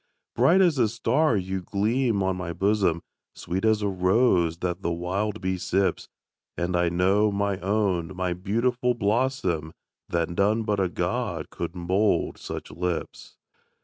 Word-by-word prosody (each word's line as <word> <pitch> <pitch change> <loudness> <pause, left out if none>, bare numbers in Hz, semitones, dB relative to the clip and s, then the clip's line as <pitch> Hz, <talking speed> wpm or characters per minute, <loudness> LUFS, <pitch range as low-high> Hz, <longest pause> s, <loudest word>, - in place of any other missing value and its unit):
Bright 165 +11 +5
as 170 -7 +3
a 110 - +3
star 120 +3 +1
you 95 0 -3
gleam 105 +3 0
on 95 0 0
my 90 -2 -4
bosom, 95 -4 +1 0.3
Sweet 90 +3 -4
as 110 -1 +2
a - - +1
rose 90 -3 +2
that 90 +1 -3
the 85 - -1
wild 95 +5 -2
bee 95 -1 -1
sips; 95 +2 0 0.5
And 90 +1 -1
I 85 -1 +2
know, 95 +5 +2
my 100 -1 -1
own, 95 -3 0
my 90 -1 -1
beautiful 120 +7 0
blossom, 100 - 0 0.4
That 85 0 -1
none 105 +5 +1
but 105 -2 0
a 95 -2 +1
God - - -3
could 85 +1 -5
mould 95 +4 0
such - - -7
lips. 90 -1 -4
95 Hz, 150 wpm, -25 LUFS, 90-110 Hz, 0.5 s, Bright